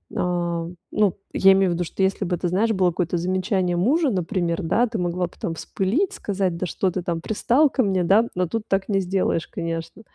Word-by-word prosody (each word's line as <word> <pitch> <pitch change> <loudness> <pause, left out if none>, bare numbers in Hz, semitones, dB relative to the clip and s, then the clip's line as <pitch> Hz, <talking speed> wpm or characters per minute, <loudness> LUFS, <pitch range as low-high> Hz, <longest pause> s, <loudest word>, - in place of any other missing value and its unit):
А, 175 -2 -1 0.2
ну 210 -4 +2 0.2
я 195 - +6
имею 190 -1 +3
в - - +1
виду, 175 - -1
что 175 - -5
если 195 +1 +1
бы 180 0 0
это, 175 - -2
знаешь 200 +6 +1
было 190 -4 +2
какое-то 175 0 -1
замечание 185 +1 0
мужа, 280 - +2
например, 180 -3 -1
да, 220 +9 +2
ты 225 -1 -4
могла 180 -1 -1
бы - - -19
там 165 - -2
вспылить, 230 - -1
сказать: 190 - -2
"Да 185 - -2
что 185 +2 -1
ты 180 0 -4
там 170 -1 -2
пристал 245 - +2
ко 260 - +1
мне." 190 -3 +1
Да, 205 +7 +4
но 180 0 0
тут 225 +5 -3
так 195 +1 0
не 195 -2 +2
сделаешь, 185 -3 0
конечно. 165 +4 -5
185 Hz, 220 wpm, -23 LUFS, 175-205 Hz, 0.2 s, я